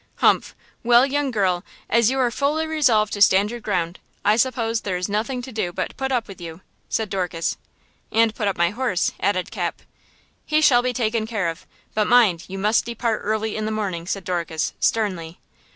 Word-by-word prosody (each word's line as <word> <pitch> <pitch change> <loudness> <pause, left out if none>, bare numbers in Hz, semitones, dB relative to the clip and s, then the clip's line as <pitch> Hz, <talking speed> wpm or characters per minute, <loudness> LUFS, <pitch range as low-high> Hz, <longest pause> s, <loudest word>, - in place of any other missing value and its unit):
"Humph! - - +2 0.3
Well, 240 +2 +5
young 285 0 0
girl, 190 -6 0 0.2
as 235 0 +3
you 265 - -1
are 250 -2 +2
fully 295 +5 0
resolved 255 -10 +2
to 205 - -4
stand 200 +1 +5
your 240 - -5
ground. 180 -5 -2 0.3
I 210 +1 +5
suppose 230 -2 0
there 185 -3 -2
is 180 - -2
nothing 230 +5 -2
to 260 - -8
do 215 -6 -2
but - - -3
to - - -17
put 265 0 -3
up 240 -4 0
with 195 -3 -11
you!" 165 +1 -8 0.3
said 220 - -1
Dorcas. 180 -4 -2 0.6
"And 225 0 +3
put 215 -2 -2
up 195 - -1
my 170 0 +2
horse," 220 -5 0
added 185 -2 0
Cap. - - -3 0.6
"He 305 - +2
shall 255 -6 +5
be 250 0 0
taken 225 -2 -1
care 210 -7 -1
of! 165 - -8 0.3
But 215 -1 +1
mind, 210 -9 +4
you 195 - -6
must 210 +3 +2
depart 235 -1 -2
early 220 +1 -1
in 215 - -2
the 215 - -2
morning!" 190 -6 -3
said 195 0 -3
Dorcas, 170 -3 -2
sternly. 180 -7 -1
215 Hz, 200 wpm, -22 LUFS, 185-240 Hz, 0.6 s, Well